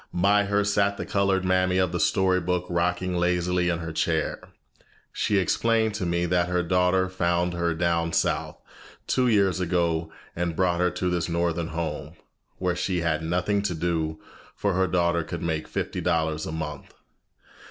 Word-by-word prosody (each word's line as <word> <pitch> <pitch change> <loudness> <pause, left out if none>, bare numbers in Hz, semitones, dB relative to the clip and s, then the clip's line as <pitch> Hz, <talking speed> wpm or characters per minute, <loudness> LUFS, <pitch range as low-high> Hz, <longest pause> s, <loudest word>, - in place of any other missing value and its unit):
By 100 +3 +3
her 100 +1 +1
sat 100 0 +1
the - - -4
colored 95 -2 +1
mammy 95 0 +2
of 95 -2 +2
the 90 - -2
story 95 0 +2
book 90 0 -1
rocking 90 +1 0
lazily 90 0 +1
in 85 - 0
her 80 -1 -5
chair. - - 0 0.7
She 105 - +1
explained 110 +4 +2
to 100 -4 -2
me 85 0 0
that 90 0 +1
her 90 0 +1
daughter 90 +2 +2
had 95 - -5
found 85 0 +1
her 85 -1 0
down 85 0 0
south, - - 0 0.5
two 130 -1 +1
years 100 -5 +3
ago, 85 -2 0 0.2
and 85 -1 -2
brought 90 -1 +1
her 90 - +3
to 90 0 -2
this 85 -1 -1
northern 85 0 0
home, 80 -2 -4 0.4
where 90 -1 -1
she 90 0 -1
had 80 -2 0
nothing 90 +5 0
to 100 -4 -2
do, 80 -2 -1 0.4
for 100 -2 0
her 95 +1 +2
daughter 85 -1 +1
could 85 +1 -6
make 80 -2 -2
fifty - - -3
dollars 80 -2 0
a - - -4
month. 75 -3 -6
90 Hz, 175 wpm, -25 LUFS, 85-95 Hz, 0.7 s, By